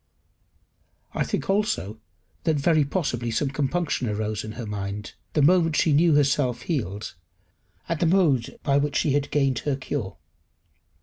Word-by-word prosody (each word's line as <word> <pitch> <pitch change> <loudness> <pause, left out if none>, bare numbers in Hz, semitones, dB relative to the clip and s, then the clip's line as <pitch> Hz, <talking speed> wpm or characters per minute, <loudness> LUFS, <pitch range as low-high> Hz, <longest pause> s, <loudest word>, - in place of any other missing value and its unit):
I - - 0
think - - -3
also 195 - 0 0.5
that 160 -2 +3
very 155 +1 +3
possibly 140 -6 -2
some 135 +5 0
compunction 145 -2 -1
arose 105 0 -2
in 110 - -6
her 120 0 -6
mind, 105 0 -5 0.2
the 150 - +3
moment 165 0 +4
she 155 - +3
knew 160 +1 +4
herself 135 -4 +2
healed, 105 - -3 0.7
at 165 -2 -2
the 170 - +2
mode 160 -10 +2
in 140 0 +3
which 145 -1 -2
she 150 - +2
had 145 0 0
gained 135 -4 +1
her 145 -2 -1
cure. 130 -6 -4
140 Hz, 150 wpm, -25 LUFS, 115-155 Hz, 0.7 s, moment